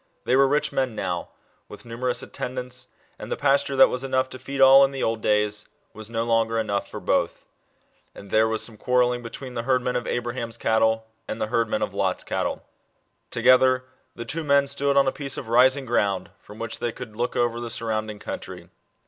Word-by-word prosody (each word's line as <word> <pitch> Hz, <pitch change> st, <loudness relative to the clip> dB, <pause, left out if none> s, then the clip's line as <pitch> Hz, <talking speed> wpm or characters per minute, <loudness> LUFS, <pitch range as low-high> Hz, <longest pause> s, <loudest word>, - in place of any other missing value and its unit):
They 125 Hz, -, +3 dB
were 135 Hz, +1 st, +5 dB
rich 145 Hz, +2 st, +1 dB
men 130 Hz, -4 st, -1 dB
now, 90 Hz, -4 st, -3 dB, 0.4 s
with -, -, -11 dB
numerous 120 Hz, +2 st, -2 dB
atten 130 Hz, -1 st, -6 dB
dants, 125 Hz, 0 st, -4 dB, 0.3 s
and -, -, -8 dB
the -, -, -1 dB
pasture 140 Hz, 0 st, +2 dB
that 135 Hz, -, +8 dB
was 125 Hz, +1 st, -3 dB
enough 130 Hz, -1 st, 0 dB
to 130 Hz, -, -9 dB
feed 140 Hz, 0 st, -6 dB
all, 135 Hz, +1 st, +8 dB
in 135 Hz, -, +4 dB
the 135 Hz, -1 st, -4 dB
old 115 Hz, -1 st, -1 dB
days, 105 Hz, 0 st, +1 dB, 0.3 s
was 110 Hz, 0 st, -9 dB
no 115 Hz, 0 st, -1 dB
longer 115 Hz, -1 st, +1 dB
enough 100 Hz, -3 st, -1 dB
for -, -, -7 dB
both. -, -, -1 dB, 0.7 s
And 100 Hz, -, -12 dB
there 110 Hz, +1 st, +4 dB
was 110 Hz, 0 st, -1 dB
some 110 Hz, -3 st, -7 dB
quarrelling 125 Hz, +1 st, +1 dB
between 125 Hz, +2 st, -8 dB
the 120 Hz, -, -2 dB
herd 125 Hz, +1 st, +1 dB
men 125 Hz, -, -1 dB
of 125 Hz, -, -2 dB
Abraham's 120 Hz, -1 st, -3 dB
cattle 110 Hz, 0 st, +2 dB, 0.2 s
and 110 Hz, -, -4 dB
the 110 Hz, -, -2 dB
herdmen 115 Hz, -1 st, 0 dB
of -, -, -3 dB
Lot's -, -, -1 dB
cattle. -, -, -3 dB, 0.6 s
Together, 130 Hz, 0 st, +4 dB, 0.3 s
the 120 Hz, -, -6 dB
two 160 Hz, +7 st, -3 dB
men 140 Hz, -1 st, +4 dB
stood 140 Hz, 0 st, 0 dB
on 135 Hz, -1 st, +5 dB
a -, -, +3 dB
piece 140 Hz, -1 st, -4 dB
of 115 Hz, -, -6 dB
rising 130 Hz, +3 st, +4 dB
ground, 100 Hz, -6 st, 0 dB
from 105 Hz, -, -14 dB
which 115 Hz, 0 st, -5 dB
they 120 Hz, -, -1 dB
could 115 Hz, -2 st, -9 dB
look 120 Hz, +2 st, -2 dB
over 120 Hz, -1 st, +1 dB
the 120 Hz, -, -4 dB
nrrounding 110 Hz, -2 st, -3 dB
country. -, -, -7 dB
120 Hz, 210 wpm, -24 LUFS, 110-130 Hz, 0.7 s, that